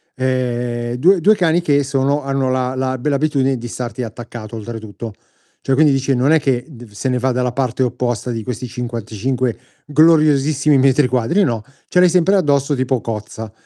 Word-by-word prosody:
Ehm, 120 -2 -2
2 175 +9 +4
2 210 +5 +4
cani 175 -2 +2
che 145 -4 +2
sono 140 +1 0
hanno 135 -1 -1
la 130 0 -1
la 130 0 -1
bella 140 +3 -1
abitudine 135 -3 +1
di 120 0 -7
starti 125 +1 -5
attaccato 115 0 -8
oltretutto. 110 0 -7 0.5
Cioè, 135 - +1
quindi 150 +2 +4
dice, 135 0 0
non 130 +3 +2
è 160 - +5
che 130 -4 0 0.3
se 105 +6 -3
ne 125 - +1
va 130 +1 0
dalla 125 0 0
parte 130 -1 -2
opposta 125 -1 -1
di 115 -2 -3
questi 125 +1 -5
55 120 0 -3 0.3
gloriosissimi 150 -2 +4
metri 135 +1 +3
quadri, 125 - +1
no. 115 - -1 0.2
Ce 180 - +1
l'hai 180 - +6
sempre 180 +2 +3
addosso 145 -5 +2
tipo 130 -1 -1
cozza. 110 -1 -6
130 Hz, 175 wpm, -18 LUFS, 120-145 Hz, 0.5 s, l'hai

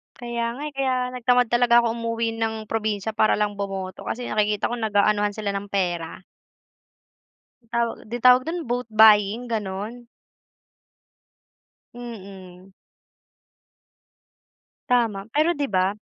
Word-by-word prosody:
Kaya 235 -1 -3
nga, 275 - -8
eh, - - -27
kaya 265 -1 +1 0.2
nag 250 -1 -9
tamad 250 -2 +4
talaga 240 0 +5
akong 235 0 -1
umuwi 230 0 -2
ng 220 -1 -3
probinsya 215 -1 -1
para 215 0 +2
lang 205 -1 -1
bumoto 195 -2 -5
kasi 245 +1 -4
nakikita 210 0 0
ko 240 - -3
nag-aanuhan 210 -1 +1
sila 210 -1 -3
ng 200 0 -4
pera. 175 -4 -2 1.4
'Yon 230 - -32
tawag 235 -1 0
'di 240 - -3
tawag 250 0 +7
do'n 335 -1 -4
vote 245 -1 -2
buying, 215 +1 +6
gano'n. 215 +4 -5 1.9
Mm. 195 -6 -11 2.2
Tama, 225 -5 +1
pero, 315 +3 +2
'di 290 - -1
ba 190 +1 +1
220 Hz, 125 wpm, -23 LUFS, 200-240 Hz, 2.2 s, tawag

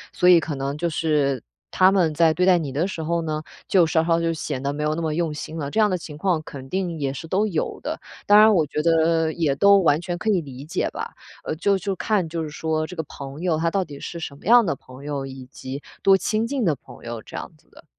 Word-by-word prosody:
所 180 - +4
以 175 -2 +8
可 160 -2 -4
能 135 +1 -3
就 170 +2 -1
是 150 -5 0 0.3
他 185 +1 +5
们 180 -5 +2
在 160 +1 +4
对 180 +3 +1
待 185 -1 +6
你 155 -5 -3
的 155 +8 0
时 165 -4 -5
候 170 +2 0
呢， 155 -1 -3 0.2
就 180 -3 +5
稍 160 0 +2
稍 165 0 +3
就 165 0 +1
显 150 -4 -4
得 140 - 0
没 145 +1 -5
有 150 +1 0
那 170 - -3
么 160 -2 -1
用 165 -1 -1
心 155 +2 -6
了， 145 -3 -3
这 145 - -6
样 215 -1 +5
的 185 - 0
情 155 -3 -9
况 175 -1 +1
肯 135 -3 -10
定 180 -2 -2
也 140 -3 -1
是 140 +4 -7
都 195 +6 +1
有 170 -7 -2
的。 - - -3 0.3
当 205 +1 +7
然 215 0 +7
我 160 -4 +3
觉 150 +1 -2
得 165 0 +2
也 155 -4 +1
都 200 +6 +6
完 155 -4 +3
全 175 0 -4
可 220 - -2
以 200 -4 +3
理 135 -4 -8
解 155 - -2
吧， - - -5 0.3
呃， - - -3
就 200 +4 +2
就 195 +1 -2
看， 200 -4 0
就 165 0 -3
是 155 - -5
说 155 0 -2
这 180 - -9
个 160 - -3
朋 140 +2 -8
友， 175 -3 +1
他 165 +1 +1
到 190 +3 0
底 145 -5 -10
是 170 - -6
什 140 - -6
么 - - -18
样 235 +2 +6
的 165 - +1
朋 130 +2 -14
友， 145 -2 -3
以 130 -1 -9
及 135 +1 -7 0.2
多 195 - +6
亲 215 +4 0
近 270 -1 -1
的 165 -7 +2
朋 - - -15
友 115 -1 -6
这 - - -12
样 - - -6
子 - - -31
的。 - - -18
160 Hz, 295 characters per minute, -23 LUFS, 150-180 Hz, 0.3 s, 以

